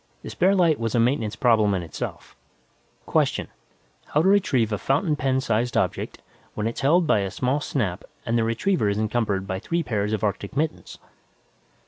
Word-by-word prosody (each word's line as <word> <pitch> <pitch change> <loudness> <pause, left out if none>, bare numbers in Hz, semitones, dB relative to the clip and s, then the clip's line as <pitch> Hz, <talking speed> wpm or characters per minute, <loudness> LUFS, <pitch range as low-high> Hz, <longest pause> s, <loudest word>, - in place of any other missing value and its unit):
The - - -7
spare 190 +3 +3
light 170 -5 +3
was 115 -1 -2
a - - +3
maintenance 115 -2 +1
problem 110 -6 +3
in 90 - -2
itself. 80 - -7 0.7
Question: - - 0 0.6
How 150 - +1
to - - +3
retrieve 135 - +3
a 105 - -1
fountain 150 +4 +1
pen 130 -2 0
sized 115 0 0
object, - - -2 0.3
when 105 - -2
it's 115 - -3
held 165 +6 +4
by 130 - +3
a 100 -1 -1
small 130 +8 -1
snap 105 -11 -2 0.2
and 115 - 0
the 115 - +2
retriever 115 - +1
is 100 - -1
encumbered 105 -3 0
by 95 -1 -3
three 170 - -1
pairs 105 -5 -1
of 110 -2 -2
arctic 100 +3 -2
mittens? 155 +1 -2
115 Hz, 180 wpm, -24 LUFS, 105-145 Hz, 0.7 s, held